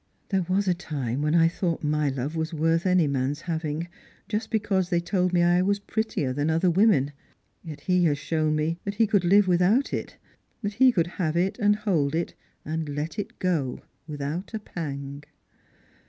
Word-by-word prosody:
" - - -42
There 190 -4 0
was 195 +2 +1
a 180 - +4
time 140 -7 -3
when 150 +2 +1
I 165 -1 +6
thought 170 -1 -2
my 150 -1 +1
love 135 +4 -3
was 160 +1 -2
worth 165 +3 +1
any 180 -3 +4
man's 140 +2 -1
having, 160 -1 -3 0.4
just 220 +1 -2
because 205 -5 0
they 175 -2 +2
told 180 +1 0
me 175 -1 +3
I 175 +1 +4
was 200 +2 +2
prettier 200 - -2
than 145 +3 0
other 165 +3 +2
women. 170 -7 +3 0.5
Yet 160 -4 -8
/is 180 -1 +3
has 145 -3 +2
shown 155 +1 0
me 160 +3 -1
that 200 0 -4
he 225 +2 +4
could 205 -3 +2
live 195 +3 +5
without 185 +9 +3
it, - - -4 0.5
that 205 0 -2
he 255 +4 +5
could 170 -8 +1 0.2
have 160 -1 0
it 190 +6 0
and 205 -1 +4
hold 170 -9 0
it, 170 +1 -2 0.3
and 160 0 -3
let 150 +5 -4
it 205 - -5
go 155 -9 -1 0.2
without 150 +8 -4
a - - -2
pang." 140 -7 -6
170 Hz, 195 wpm, -26 LUFS, 150-190 Hz, 0.5 s, I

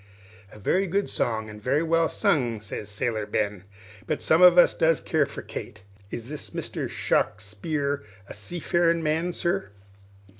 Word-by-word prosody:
"A - - -13
very 185 - +1
good 200 +3 0
song, 110 -2 -1
and 105 0 -10
very 140 +7 +1
well 165 0 +2
sung," 125 - +1
says 105 0 -6
Sailor 110 0 -2
Ben; 100 -2 -2 0.4
"but 155 - -2
some 160 +2 +4
of 180 -1 +8
us 175 - +7
does 160 -1 +3
care - - +1
for - - -8
Kate. - - -8 0.3
Is 115 +1 -6
this 150 +1 -6
Mr. - - -4
Shawkspear 140 +8 -1 0.3
a - - -8
seafarin' 170 - 0
man, 160 +3 0
sir?" 175 - -1
150 Hz, 155 wpm, -26 LUFS, 105-170 Hz, 0.4 s, of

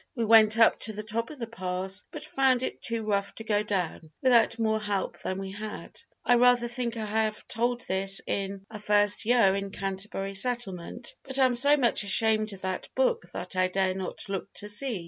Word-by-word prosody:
We 235 -3 -1
went 220 0 +6
up 225 -1 +5
to 220 - +2
the 215 +1 -6
top 225 +2 -3
of 305 - -10
the 235 - -4
pass 190 -3 -3
but - - -8
found 260 -2 +2
it - - -4
too 230 -2 -1
rough 200 -2 -1
to 225 - -8
go 210 -2 +1
down 180 -6 -3
without 235 -3 +4
more 220 -1 +1
help 205 -3 -3
than 185 - -3
we 195 0 -5
had. 210 +2 -8 0.2
I 245 - +5
rather 245 0 +4
think 240 -1 -4
I 220 - -3
have 215 0 -1
told 240 +2 -1
this 195 -2 -1
in 195 0 -3
A 210 - -7
First 205 0 +2
Year 230 -5 +4
in 195 0 -3
Canterbury 195 0 -4
Settlement, 235 -1 -3
but 265 -1 -4
am 260 -2 +4
so 285 +5 +5
much 240 -5 +2
ashamed 215 +1 +3
of 195 -1 -11
that 185 0 -4
book - - +1
that - - -6
I 185 0 +3
dare 185 0 0
not 190 -1 -6
look 195 0 -4
to 205 - -5
see. 225 0 -2
215 Hz, 205 wpm, -27 LUFS, 195-235 Hz, 0.2 s, went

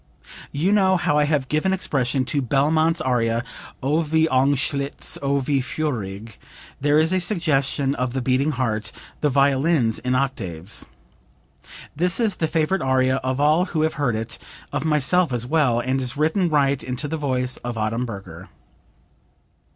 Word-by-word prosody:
You 165 +8 0
know 190 -2 +4
how 150 -3 +1
I 150 - +3
have 145 -3 0
given 155 +7 0
expression 135 -7 0
to 140 +2 -1
Belmont's 155 +6 +2
aria, 120 -4 0 0.4
'O, 145 +4 +1
wie 160 0 +2
angstlich, 140 +1 0
O 140 0 +1
wie 135 0 0
feurig,' 110 -8 -4 0.4
there 145 +1 +3
is 160 +3 +2
a 185 - +2
suggestion 145 -7 0
of 125 -2 -2
the 130 - -1
beating 135 +4 +1
heart, 110 -4 -2 0.3
the 150 - +1
violins 140 -2 +2
in 125 +1 -1
octaves. 100 -9 -2 1.1
This 180 +6 0
is 220 -5 +1
the 160 - 0
favorite 165 +4 0
aria 130 0 +2
of 130 0 -2
all 155 +5 +3
who 160 -4 -1
have 160 - +1
heard 125 -5 +1
it, 110 0 -4 0.3
of - - -1
myself, 155 +2 +2
as 120 -1 -2
well, 135 -4 +2
and 130 +2 -1
is 125 +2 -2
written 160 +4 +1
right 140 -3 +1
into 125 +4 -3
the 160 - -3
voice 130 -3 -1
of 120 -1 -5
Adamberger. 105 -6 -4
140 Hz, 160 wpm, -22 LUFS, 125-155 Hz, 1.1 s, know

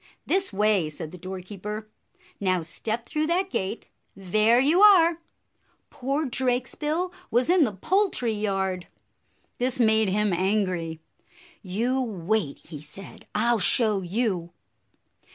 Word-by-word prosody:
"This 380 0 +1
way!" 200 -5 +2
said 155 +1 -8
the 180 - -11
doorkeeper. 195 +4 -7 0.5
"Now 185 -3 0
step 220 +9 -4
through 310 +3 -2
that 370 +3 0
gate. 190 +4 -3 0.3
There 215 +5 +3
you 305 +8 +3
are! 345 -5 +6 0.4
" - - -41
Poor 275 +4 -2
Drakesbill 265 +7 -1 0.2
was 250 +8 +2
in 360 -4 +5
the 220 - -2
poultry 315 - 0
yard. 195 -3 -2 0.7
This 255 +1 -1
made 220 -3 +4
him 210 0 +1
angry. 180 -4 -1 0.6
"You 230 +7 -1
wait," 205 - -2
he 150 -4 -9
said; 155 +6 -12
" - - -40
I 235 +3 +2
'll 230 - 0
show 210 +1 +4
you 185 -3 -2
215 Hz, 135 wpm, -25 LUFS, 185-260 Hz, 0.7 s, are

